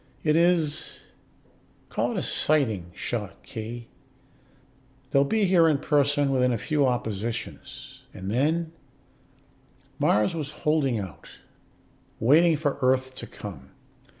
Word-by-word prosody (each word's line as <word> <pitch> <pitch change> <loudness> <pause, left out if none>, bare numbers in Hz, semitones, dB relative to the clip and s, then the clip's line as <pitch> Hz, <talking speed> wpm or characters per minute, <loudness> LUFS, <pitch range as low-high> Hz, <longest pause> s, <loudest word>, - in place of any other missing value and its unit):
It 150 -1 +3
is 165 -3 +1 0.9
call - - -1
it - - -3
a - - -1
sighting 110 - +1
shot, 105 -5 -4
Khee. 115 +1 -7 1.2
They'll 140 - +5
be 215 +9 +1
here 175 -3 +5
in 155 -3 +3
person 145 -1 +2
within 125 -1 +2
a 120 - 0
few 145 +3 +1
oppositions. 115 -2 -4
And 95 +1 -6
then 160 +7 +1 0.6
" - - -34
Mars 105 0 +3
was 155 -4 -3 0.2
holding 150 -6 +2
out, 95 -5 -8 0.9
waiting 155 +7 +5
for 145 -2 -1
Earth 130 0 +2
to - - -8
come. 70 -11 -10
135 Hz, 125 wpm, -26 LUFS, 115-155 Hz, 1.2 s, They'll